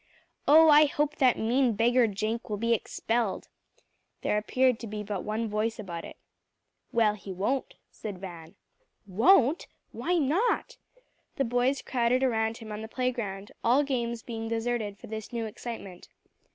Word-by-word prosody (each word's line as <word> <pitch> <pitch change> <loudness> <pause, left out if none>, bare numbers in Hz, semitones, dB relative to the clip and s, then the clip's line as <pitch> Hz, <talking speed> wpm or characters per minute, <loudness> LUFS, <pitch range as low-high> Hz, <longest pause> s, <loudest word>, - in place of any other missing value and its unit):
"Oh, 315 +2 +8
I 300 0 +8
hope 295 +1 -1
that 255 -4 +4
mean 240 +2 +2
beggar 235 +3 +3
Jenk 215 +3 -3
will 210 - -2
be 230 +2 +1
expelled." 230 -1 -2 0.7
There - - +1
appeared 255 +2 +2
to 230 - -7
be 210 0 -5
but 200 -2 -4
one 220 +2 -2
voice 215 +2 -1
about 175 -6 -6
it. - - -11 0.7
"Well, 225 -4 +3
he 200 -2 -9
won't," 210 +9 -2 0.2
said 205 -3 -7
Van. 170 -3 -10 0.5
"Won't? 260 - +4 0.2
Why 360 - -1
not?" 360 - +1 0.6
The 275 - 0
boys 245 +3 +1
crowded 250 +1 +1
around 225 -3 +1
him 220 -1 -9
on 210 0 -5
the 220 - -6
playground, 225 -5 -3
all 255 +5 +4
games 235 -4 -2
being 225 -2 -5
deserted 225 -2 -2
for - - -12
this 220 0 -7
new 230 -2 -2
excitement. 215 -4 -8
230 Hz, 155 wpm, -28 LUFS, 210-255 Hz, 0.7 s, Oh